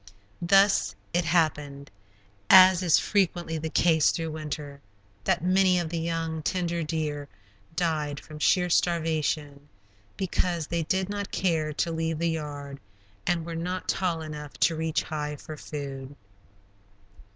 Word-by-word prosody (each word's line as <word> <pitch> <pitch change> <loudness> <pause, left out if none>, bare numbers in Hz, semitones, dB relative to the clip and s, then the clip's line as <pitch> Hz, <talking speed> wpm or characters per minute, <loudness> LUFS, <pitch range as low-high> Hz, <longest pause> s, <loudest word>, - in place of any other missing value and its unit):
Thus 175 - +4 0.2
it 175 0 +1
happened, 150 -4 0 0.6
as 185 -1 +8
is 175 -4 +4
frequently 175 -5 0
the 160 +1 -3
case 160 -1 +4
through 165 -1 -2
winter, 150 -2 -6 0.4
that - - +1
many 185 0 +4
of 170 -2 -1
the 170 0 -2
young, 165 -1 -2
tender 170 0 -1
deer 150 -2 -3 0.5
died 155 -5 -1
from 155 -1 -11
sheer 180 +3 +3
starvation, 155 -4 0 0.5
because 175 -3 -1
they 170 +2 -2
did 190 +4 0
not 205 0 -4
care 160 -5 0
to 165 +3 -1
leave 160 -1 -1
the 170 +1 0
"yard" 145 -3 -6 0.5
and 170 -2 +1
were 170 - -5
not 180 +3 -4
tall 170 -4 0
enough 150 -2 -7
to 165 - +4
reach 160 0 -1
high 150 -1 -4
for 155 +2 -9
food. 140 -2 -7
160 Hz, 140 wpm, -27 LUFS, 150-175 Hz, 0.6 s, as